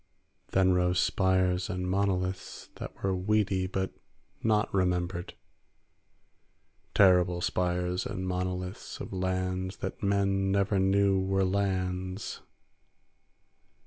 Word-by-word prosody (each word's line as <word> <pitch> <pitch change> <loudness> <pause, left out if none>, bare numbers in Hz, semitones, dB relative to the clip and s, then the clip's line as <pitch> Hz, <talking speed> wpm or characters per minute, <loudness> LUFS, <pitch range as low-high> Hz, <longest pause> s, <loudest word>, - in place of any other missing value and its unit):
Then 95 -1 +3
rose 90 0 +2
spires 95 -1 +2
and 90 -2 -2
monoliths 95 -1 -1
that - - -9
were 95 -1 +1
weedy 95 -1 +1
but 95 0 -2 0.5
not 110 -1 +1
remembered; 90 -1 -1 1.6
terrible 90 -2 +5
spires 90 0 -1
and 95 0 -4
monoliths 90 0 -4
of - - -7
lands 95 0 -2
that - - -5
men 100 -1 +1
never 100 0 +2
knew 95 0 +3
were 95 0 +1
lands. 95 0 -2
95 Hz, 100 wpm, -29 LUFS, 90-95 Hz, 1.6 s, terrible